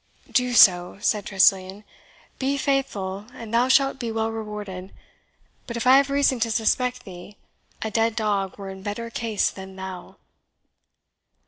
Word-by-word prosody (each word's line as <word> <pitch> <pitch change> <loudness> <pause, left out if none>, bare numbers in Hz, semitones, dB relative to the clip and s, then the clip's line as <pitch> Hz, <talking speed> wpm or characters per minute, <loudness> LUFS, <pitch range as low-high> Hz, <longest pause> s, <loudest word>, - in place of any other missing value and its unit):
"Do 250 -1 +1
so," 180 -4 +5
said 210 -1 0
Tressilian; 190 +1 +2 0.6
"be 275 +1 0
faithful, 210 -9 -2
and 230 -1 -9
thou 240 +2 +3
shalt 270 +1 +3
be 235 -2 -3
well 225 0 -1
rewarded. 210 -4 -7 0.8
But 235 - -5
if 235 - -3
I 260 +1 +7
have 280 0 +2
reason 275 -2 +2
to 230 0 0
suspect 250 +3 0
thee, 185 +1 -11 0.5
a 220 - -3
dead 225 +1 +1
dog 205 -4 -1
were 195 -1 -7
in 190 0 -10
better 220 +4 -5
case 225 -3 -1
than 190 0 -10
thou!" 190 -1 -8
220 Hz, 150 wpm, -24 LUFS, 195-245 Hz, 0.8 s, I